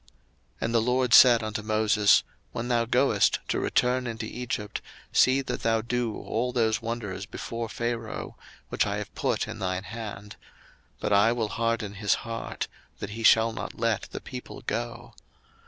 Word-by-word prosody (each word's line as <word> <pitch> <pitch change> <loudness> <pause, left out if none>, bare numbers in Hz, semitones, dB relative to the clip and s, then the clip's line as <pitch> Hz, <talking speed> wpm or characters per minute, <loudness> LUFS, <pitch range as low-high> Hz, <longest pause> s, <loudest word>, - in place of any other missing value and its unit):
02:004:021 - - -27 0.5
And 115 +1 -1
the 115 - +4
LORD 125 +1 +1
said 120 -3 +8
unto 110 0 -3
Moses, 110 -1 +4 0.3
When 120 +2 -3
thou 120 -1 +2
goest 115 - +3
to - - +1
return 125 0 +1
into 115 -1 -4
Egypt, 110 -3 -4 0.3
see 130 +1 +4
that - - -4
thou 115 -1 +2
do 120 -1 -2
all 125 +3 -2
those 115 -2 +1
wonders 115 -4 -4
before 115 -1 -5
Pharaoh, 115 -1 -4 0.3
which - - +1
I - - -1
have - - -6
put - - -1
in 110 0 -7
thine 95 -1 -2
hand: 105 -1 -7 0.6
but 105 - 0
I 100 +3 +5
will 115 -3 -1
harden 115 -3 -1
his 105 0 +1
heart, 115 0 -4 0.3
that 100 - -6
he 115 +2 -6
shall 115 +1 +5
not - - -6
let 115 -3 0
the - - -5
people - - -8
go. - - -4
115 Hz, 170 wpm, -27 LUFS, 105-120 Hz, 0.6 s, said